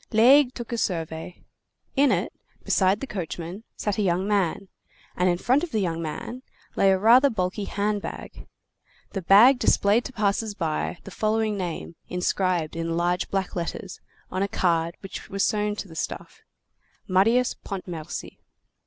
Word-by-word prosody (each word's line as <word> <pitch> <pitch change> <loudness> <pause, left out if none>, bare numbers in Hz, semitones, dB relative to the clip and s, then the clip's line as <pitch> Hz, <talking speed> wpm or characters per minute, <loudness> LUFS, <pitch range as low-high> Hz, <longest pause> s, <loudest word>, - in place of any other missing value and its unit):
Laigle 250 +4 +6
took 240 -1 -7
a 235 - -1
survey. 165 -2 -3 0.5
In 280 0 +4
it, - - 0 0.3
beside 190 +1 +2
the - - -2
coachman, 180 - -6
sat 210 0 -2
a - - +3
young 185 0 +1
man, 195 -2 0 0.5
and 180 +1 +2
in 175 - +1
front 255 - +2
of 350 - -3
the 220 - -1
young 165 -4 -1
man 200 +10 -5 0.3
lay 195 - +4
a 190 - +3
rather 240 +8 +6
bulky 200 -1 -2
hand 205 +1 -1
bag. - - -8 0.6
The 195 - -3
bag 225 +9 +7
displayed 210 +1 +3
to - - -5
passers 210 -1 -1
by 165 -1 -2
the 195 - -10
following 215 +1 0
name 175 -3 -4 0.2
inscribed 180 -3 0
in 165 0 -2
large 175 +1 0
black 195 -1 -2
letters 175 +1 -5 0.3
on 185 - -2
a 200 - +1
card 170 -3 0
which 195 - -8
was 195 0 +1
sewn 210 -1 0
to 210 - -6
the 165 - -12
stuff: - - -5 0.7
MARIUS 225 +7 +3
PONTMERCY. 180 -5 -6
195 Hz, 160 wpm, -25 LUFS, 175-220 Hz, 0.7 s, bag